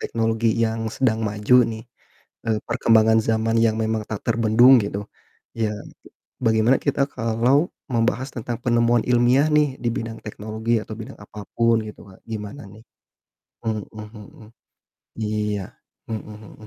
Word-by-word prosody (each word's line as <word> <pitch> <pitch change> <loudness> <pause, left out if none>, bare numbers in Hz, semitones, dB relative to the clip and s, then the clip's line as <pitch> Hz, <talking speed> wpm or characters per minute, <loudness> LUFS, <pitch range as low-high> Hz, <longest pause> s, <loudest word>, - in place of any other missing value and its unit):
teknologi 115 0 0
yang 115 -1 -1
sedang 115 -4 0
maju 105 +4 +3 0.2
nih, 110 0 -7 0.6
eee, 110 -1 +1
perkembangan 110 -2 +4
zaman 115 0 +1
yang 110 -1 +2
memang 110 0 -1
tak 110 - -4
terbendung 115 +3 +5
gitu, 100 0 -5 0.5
ya, 110 -2 0 0.7
bagaimana 110 +3 +4
kita 140 0 +1
kalau 120 +8 +1 0.2
membahas 120 +2 0
tentang 120 0 -4
penemuan 120 -1 +3
ilmiah 125 +4 +4
nih 150 -3 +2
di 120 - +1
bidang 115 0 -5
teknologi 110 +2 -2
atau - - -8
bidang - - -10
apapun 105 +3 -1
gitu 105 - -10
Kak, 95 - -17
gimana 110 +6 -6
nih? 110 +3 -15 0.8
Mhm 110 -2 -2
mhm. 105 0 -12 0.7
Iya, 105 -2 -1 0.5
mhm 110 -1 -5 0.2
mhm. 110 - -14
110 Hz, 135 wpm, -22 LUFS, 110-120 Hz, 0.8 s, terbendung